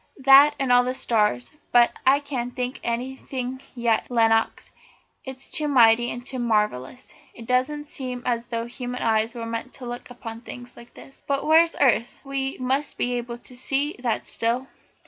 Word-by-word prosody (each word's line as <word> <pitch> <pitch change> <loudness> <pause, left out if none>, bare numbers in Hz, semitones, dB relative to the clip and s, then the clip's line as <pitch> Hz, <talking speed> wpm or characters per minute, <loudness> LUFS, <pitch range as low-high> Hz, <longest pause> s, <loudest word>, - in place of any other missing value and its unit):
That 275 +2 +8
and 270 -2 0
all 245 0 +6
the 255 +1 -2
stars 210 - 0 0.2
but 240 -1 +5 0.2
I 280 +2 +5
can't 250 -4 -4
think 250 0 -3
anything 255 +1 -4
yet, 235 -2 0
Lenox, 225 -2 +1 0.5
it's 265 0 -7
all - - -13
too 310 -4 +1
mighty 240 -3 +5
and 245 0 -6
too 265 -1 -4
marvellous. 210 - -1 0.2
It 230 - -10
doesn't 275 +5 0
seem 250 -2 -5
as 235 -1 -1
though 230 -1 -3
human 245 +1 -5
eyes 225 +1 +1
were 230 -1 -5
meant 230 +3 -5
to 255 - -9
look 240 +1 -7
upon 230 -2 -8
things 245 0 -10
like 235 0 -15
this. 270 - -15
But 275 0 -1
where's 330 +2 +5
the - - +1
earth? 240 -3 +2
We 275 -1 -3
must 265 +3 -1
be 245 - 0
able 240 -1 -4
to 250 +1 -11
see 275 +4 -1
that 240 -3 -2
still." 240 +4 -1
245 Hz, 185 wpm, -24 LUFS, 235-265 Hz, 0.5 s, That